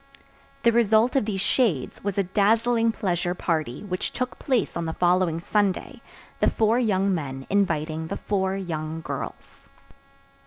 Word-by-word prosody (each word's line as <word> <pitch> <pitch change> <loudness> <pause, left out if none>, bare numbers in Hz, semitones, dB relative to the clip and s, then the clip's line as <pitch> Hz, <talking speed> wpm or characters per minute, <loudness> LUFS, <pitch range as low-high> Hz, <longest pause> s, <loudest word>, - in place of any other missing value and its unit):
The 235 - +5
result 230 +2 +3
of 265 - +3
these 200 -3 -2
shades 195 - 0
was 200 -1 -2
a 200 - +3
dazzling 225 +4 +2
pleasure 180 -4 -1
party 155 -5 -2
which 185 -3 -3
took 255 -1 -4
place 255 -7 0
on 170 - -2
the 160 - -3
following 175 -2 +2
Sunday, 200 +2 -1 0.4
the - - +4
four 225 +2 +2
young 200 -4 +2
men 135 -5 -4
inviting 160 -5 0
the - - -4
four 190 -2 -1
young 160 -3 -4
girls. - - -7
190 Hz, 150 wpm, -25 LUFS, 165-220 Hz, 0.4 s, The